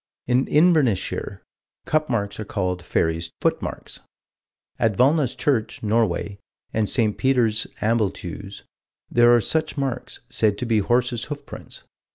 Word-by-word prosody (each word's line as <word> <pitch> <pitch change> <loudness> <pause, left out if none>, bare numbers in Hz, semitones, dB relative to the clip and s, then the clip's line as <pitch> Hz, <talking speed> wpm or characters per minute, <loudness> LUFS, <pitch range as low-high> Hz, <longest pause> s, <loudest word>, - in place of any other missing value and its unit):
In 125 +2 +2
Inverness 150 - +4
shire, 95 - -5 0.4
cup 155 0 0
marks 100 -5 -2
are - - -2
called 90 -4 -3
"fairies' 80 -1 -1
footmarks." - - -3 0.8
At 110 -4 +1
Valna's 135 0 +3
church, 115 -7 -1
Norway, 105 -2 0 0.3
and 110 -2 0
St. 110 -5 +1
Peter's, 120 -5 +1
Ambleteuse, 100 -3 -2 0.5
there 120 0 +5
are - - +4
such 155 +7 -1
marks, 135 -3 -3
said 110 -5 +2
to 125 - -3
be 115 -2 +2
horses' 120 +2 +1
hoofprints. 145 -1 -9
115 Hz, 130 wpm, -23 LUFS, 100-130 Hz, 0.8 s, there